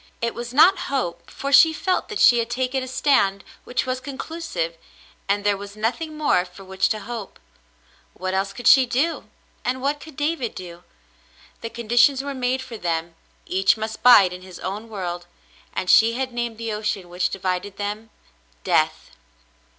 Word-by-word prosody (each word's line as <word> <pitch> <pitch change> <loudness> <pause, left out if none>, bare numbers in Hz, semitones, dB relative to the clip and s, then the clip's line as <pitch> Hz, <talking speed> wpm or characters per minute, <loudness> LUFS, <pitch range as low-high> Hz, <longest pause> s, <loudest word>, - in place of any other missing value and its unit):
It 230 0 -1
was 240 0 -6
not 325 +9 +6
hope, 175 -11 -3
for 275 0 -4
she 320 +3 +8
felt 370 +4 -1
that 425 - -3
she 240 -9 +6
had 230 0 -2
taken 255 +2 -1
a 260 - -5
stand 200 -7 +2 0.2
which 245 - -1
was 255 0 -2
conclusive, 275 - -5 0.5
and 205 +1 +1
there 205 0 +2
was 200 +1 -9
nothing 280 +9 -3
more 290 -12 +2
for 180 +2 -13
which 190 0 0
to 215 -1 -2
hope. 230 -4 -7 0.8
What 185 0 -3
else 195 +1 0
could 245 +3 -10
she 260 +1 +7
do, 295 +8 0 0.4
and 255 +1 -1
what 285 +3 -1
could 315 -1 -12
David 295 -5 -1
do 175 -2 -8
^ 175 - -25 0.8
The 230 - -4
con 235 -1 -8
ditions 245 +4 +4
were 280 0 -4
made 260 0 -1
for 240 -3 -8
them; 170 -2 -2 0.3
each 190 +4 +2
must 220 0 -5
bide 205 -7 +7
in 180 - -9
his 185 -1 -11
own 210 +4 -5
world, 175 -4 -5 0.4
and 185 - -3
she 225 +4 +6
had 260 +1 -3
named 240 -2 -3
the 230 -1 -4
ocean 210 -3 -3
which 175 0 -1
divided 185 +1 -3
them, 210 +2 -4 0.5
Death." - - +1
230 Hz, 180 wpm, -23 LUFS, 195-260 Hz, 0.8 s, she